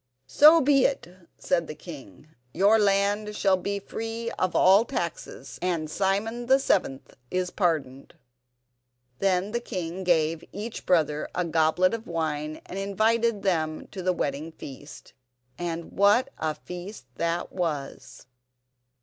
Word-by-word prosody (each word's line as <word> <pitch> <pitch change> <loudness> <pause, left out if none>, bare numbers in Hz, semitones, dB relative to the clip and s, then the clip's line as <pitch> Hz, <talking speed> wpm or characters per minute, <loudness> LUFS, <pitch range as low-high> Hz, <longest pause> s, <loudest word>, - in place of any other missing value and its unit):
"So 305 - +7
be 275 -1 +4
it," 275 - 0 0.3
said 170 -3 0
the 155 - -7
king; 145 - -12 0.3
"your 200 +5 +5
land 205 +1 +1
shall 195 -2 +3
be 200 +2 -3
free 225 +3 -5
of 185 - -2
all 195 +4 +6
taxes, 175 -10 -5
and 170 -4 -1
Simon 210 +6 -1
the 265 +1 +6
seventh 160 - -1 0.2
is 180 -1 -1
pardoned." 150 -8 -2 1.0
Then 195 +1 +1
the 235 - -1
king 185 -5 -5
gave 165 -2 +1
each 215 +4 -7
brother 155 -4 +1
a 180 - 0
goblet 165 +3 +2
of 230 0 -5
wine 155 -2 -3
and 190 - -6
invited 220 +2 +1
them 160 -5 -1
to 190 - -6
the 185 0 +1
wedding 150 -1 -3
feast. 145 0 -11 0.5
And 170 -1 -4
what 210 +7 +3
a 155 -1 -1
feast 180 - -9
that 170 +1 -1
was! 155 -10 -4
185 Hz, 135 wpm, -26 LUFS, 160-210 Hz, 1.0 s, So